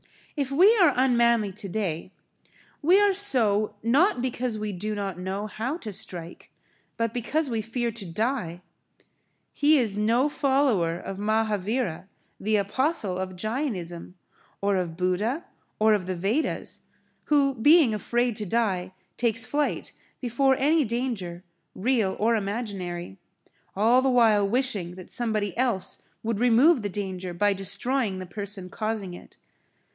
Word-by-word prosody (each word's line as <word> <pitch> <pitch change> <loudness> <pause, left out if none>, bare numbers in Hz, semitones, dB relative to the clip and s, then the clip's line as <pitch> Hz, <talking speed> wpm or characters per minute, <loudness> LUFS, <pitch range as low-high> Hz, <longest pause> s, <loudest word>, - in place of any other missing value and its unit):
If 280 -4 -1
we 370 +11 +5
are 345 -7 +5
unmanly 235 -4 +3
today, 185 -3 -4 0.7
we 350 +6 +5
are 410 -1 +4
so, 225 - +3
not 265 - +3
because 250 -2 -2
we 215 0 -3
do 210 +3 -4
not 195 -3 -4
know 190 +3 -3
how 230 +8 -4
to 220 - -7
strike, 175 -2 -7 0.5
but 230 -1 -1
because 265 +4 -1
we 225 -1 -1
fear 235 +1 -2
to 220 -3 -8
die. 180 -2 -2 0.9
He 300 +1 +4
is 215 -6 0
no 230 +6 +3
follower 265 - +1
of 195 +2 -7
Mahavira, 210 -3 -1 0.3
the 215 +2 0
apostle 210 - 0
of 185 0 -4
Jainism, 185 - -4 0.4
or 200 0 +1
of 175 -3 -2
Buddha 205 - -1 0.3
or 215 0 +4
of 190 -4 -1
the 185 - -2
Vedas, 205 - -2 0.4
who 280 -2 +3
being 285 +1 +5
afraid 240 +2 0
to 210 - -4
die, 190 -4 -1 0.2
takes 230 -1 +2
flight 295 0 -2 0.3
before 265 +2 +2
any 300 +4 +3
danger, 220 -8 -3 0.3
real 220 -3 +1
or 230 +2 +2
imaginary, 195 - -4 0.6
all 230 +6 +4
the 265 - +2
while 220 -5 +4
wishing 210 -7 -1
that 185 -1 -10
somebody 215 -5 -1
else 235 -7 0 0.2
would 225 -2 -2
remove 245 +5 +5
the 205 - -3
danger 185 -2 -5
by 205 +3 +2
destroying 205 +3 0
the[Pg 185 -1 -8
22] - - -19
person 200 -3 -4
causing 215 -4 -3
it. - - -13
220 Hz, 140 wpm, -26 LUFS, 190-255 Hz, 0.9 s, we